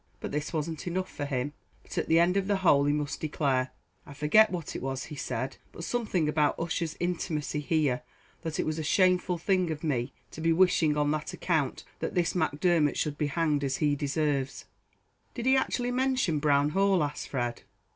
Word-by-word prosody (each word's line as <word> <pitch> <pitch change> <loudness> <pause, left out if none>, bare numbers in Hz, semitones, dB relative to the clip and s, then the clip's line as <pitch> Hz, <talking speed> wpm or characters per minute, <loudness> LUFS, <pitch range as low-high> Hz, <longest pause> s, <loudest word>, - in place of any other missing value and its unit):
But - - -5
this 150 +1 -2
wasn't 160 +1 -3
enough 185 +2 -2
for 145 - -4
him, 140 +1 -2 0.3
but - - -10
at - - -1
the 160 - +4
end 175 +2 +4
of 195 -1 +1
the 205 - +2
whole 140 -4 +5
he 145 - +3
must 150 -1 -2
declare 135 -4 0 0.3
I 145 - -12
forget 150 +10 +5
what 175 -4 -5
it - - -4
was 135 0 -3
he 150 - -8
said 135 -1 -3
but 170 - -9
something 200 -8 0
about 150 -1 +1
Ussher's 165 -1 -2
intimacy 160 -4 -2
here 145 -4 +1 0.4
that 160 -2 -4
it - - +1
was 155 +1 -2
a - - -2
shameful 180 +2 +3
thing 185 0 +1
of 155 -1 -4
me 130 -5 -1 0.2
to 160 - -8
be 165 +1 +3
wishing 165 -4 +3
on 145 0 +2
that 155 0 -3
account 155 -7 -1 0.2
that - - -3
this 175 -2 +1
Macdermot 160 -2 +2
should 150 -2 -2
be 150 - +1
hanged, 150 -1 0
as 135 -1 0
he 145 -1 +2
deserves." 140 -1 -1 0.7
"Did 240 - -4
he 265 +1 +5
actually 245 -2 0
mention 255 - +1
Brown 145 -1 +3
Hall?" 195 0 +3
asked 145 0 -4
Fred. 120 -3 -2
155 Hz, 200 wpm, -29 LUFS, 145-175 Hz, 0.7 s, whole